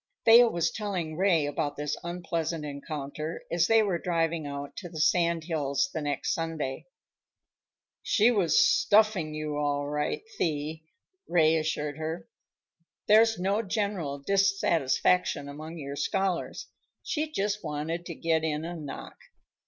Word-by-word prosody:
Thea 235 +1 +8
was 170 -5 0
telling 185 -7 -3
Ray 175 -4 +3
about 145 0 -2
this 150 0 -2
unpleasant 170 -2 -3
encounter 150 +2 -5
as 170 -1 +2
they 225 -1 +5
were 190 -5 0
driving 165 -3 -1
out 140 0 -6
to 175 - -6
the 160 -2 -7
sand 170 0 +2
hills 160 - -1
the 160 - -2
next 145 -2 -1
Sunday. 160 -5 -3 1.1
"She 220 +3 +3
was 185 -9 +3
stuffing 205 -7 +3
you, 155 -1 -3
all 145 -1 0
right, 150 - -2 0.2
Thee," 155 0 -2 0.4
Ray 160 -3 +4
reassured 155 -2 -1
her. 160 +2 -4 0.8
"There's 225 +1 +5
no 195 +4 +1
general 200 -8 -2
dissatisfaction 180 -3 +1
among 155 +4 -8
your 140 -2 -6
scholars. 190 +3 -1 0.4
She 305 0 -2
just 210 -4 -1
wanted 160 +3 -3
to 170 - -6
get 160 0 0
in 155 0 -1
a 175 +1 -5
knock. 150 -4 -8
165 Hz, 135 wpm, -28 LUFS, 150-190 Hz, 1.1 s, Thea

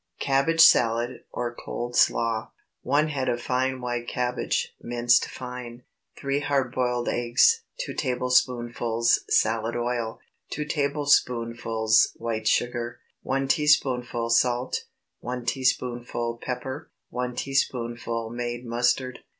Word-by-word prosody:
CABBAGE 140 +4 +2
SALAD, 120 -3 +4
OR 120 -1 -3
COLD 120 0 -5
SLAW. 115 -1 +2
✠ - - -27 0.3
1 150 +2 +2
head 135 -3 -1
of 120 - 0
fine 130 +1 -1
white 120 -1 -3
cabbage, 125 0 -1
minced 120 0 +3
fine. 125 -1 -8 0.3
3 140 +1 -1
hard 140 -3 0
boiled 125 -1 0
eggs. 120 - +3 0.2
2 - - -5
tablespoonfuls 120 -3 +1
salad 115 +1 +2
oil. 120 -1 -2 0.3
2 150 - -3
tablespoonfuls 120 -7 +2
white 110 -1 -3
sugar. 120 0 0 0.2
1 135 +1 -1
teaspoonful 125 -5 +2
salt. 120 +2 +1 0.3
1 125 0 -5
teaspoonful 120 -2 -1
pepper. 130 +3 -5 0.2
1 125 0 -3
teaspoonful 120 -4 -2
made 120 0 -4
mustard. 120 +2 0
120 Hz, 110 wpm, -26 LUFS, 120-130 Hz, 0.3 s, SALAD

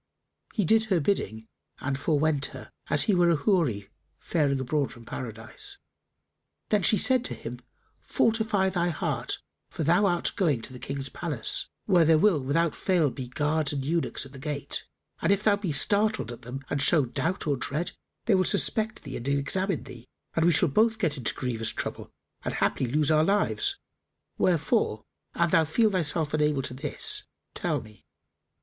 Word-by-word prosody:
He 210 -5 +1
did 220 +5 +4
her 190 -5 +2
bidding 110 - -1 0.3
and 140 0 -2
forewent 150 0 +1
her, - - -12 0.2
as - - +4
he 210 - +2
were 175 -1 +4
a 170 - +4
Houri 145 - 0 0.3
faring 145 -5 0
abroad 140 +2 -1
from 120 -2 -13
Paradise. 120 - -7 0.9
Then 210 -3 +2
said 210 +5 +4
she 260 -1 +3
to 250 - -4
him, - - -7 0.4
"Fortify 220 -4 +1
thy 175 -1 0
heart, 160 - -2 0.3
for - - -4
thou 175 +7 +4
art 175 -2 +1
going 150 - +1
to 130 - -5
the 125 - -9
King's 135 0 -4
palace, 150 -11 -1 0.2
where 180 -5 +4
there 160 0 +5
will 175 -2 +4
without 150 +4 +1
fail 170 -7 +1
be 130 -1 -6
guards 150 +3 0
and 135 -2 -3
eunuchs 165 -1 0
at 135 - -13
the 135 - -11
gate; 145 0 -3 0.3
and - - +2
if 200 +1 +2
thou 210 -2 +4
be 200 -5 -3
startled 205 - +1
at 120 0 -9
them 130 +3 -8
and 145 - -1
show 150 -2 +4
doubt 160 +9 -2
or 145 -2 +1
dread, 150 +6 -2 0.3
they 225 - +3
will 185 -1 +4
suspect 220 +4 +3
thee 135 -3 -6
and 120 - -6
examine 150 +6 0
thee, 120 0 -12 0.3
and 165 - +2
we 175 - +5
shall 165 +3 +5
both 220 +9 +3
get 165 -8 0
into 125 -6 -1
grievous 115 -3 -1
trouble - - -4 0.3
and - - -3
haply 130 - 0
lose 150 +4 +1
our 155 0 +4
lives: 300 - +2 0.6
wherefore 165 - +1 0.3
an 170 -1 +1
thou 165 -3 +5
feel 210 +8 +2
thyself 160 -4 0
unable 150 -3 +1
to 130 - -5
this, 140 +3 -2 0.3
tell - - -1
me." 105 -2 -16
155 Hz, 180 wpm, -27 LUFS, 135-190 Hz, 0.9 s, there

